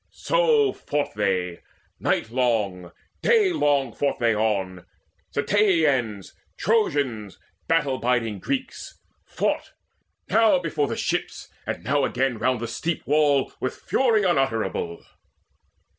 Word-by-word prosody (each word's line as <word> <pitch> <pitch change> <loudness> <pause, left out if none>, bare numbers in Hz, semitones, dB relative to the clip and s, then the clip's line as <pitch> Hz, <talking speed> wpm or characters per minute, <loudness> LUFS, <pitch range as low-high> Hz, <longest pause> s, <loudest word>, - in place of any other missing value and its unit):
So 470 -4 +2
fought 145 0 -3
they: 95 -4 -1 0.4
nightlong, 110 -7 0 0.3
daylong 150 - +2
fought 140 - 0
they 115 -2 +2
on, 95 -4 -1 0.5
Ceteians, 140 - +1 0.3
Trojans, 140 - 0 0.3
battle 150 -5 +1
biding 115 -4 0
Greeks, 260 - -4 0.3
Fought, - - -2 0.5
now 220 -3 +4
before 155 -4 -1
the 115 - -4
ships, - - -3 0.2
and - - -4
now 140 +1 +1
again 125 -3 0
Round 125 0 +1
the 115 - -4
steep 160 +8 -3
wall, 145 -2 +2
with 130 - -3
fury 230 -5 +1
unutterable. 130 - 0
135 Hz, 105 wpm, -24 LUFS, 110-170 Hz, 0.5 s, now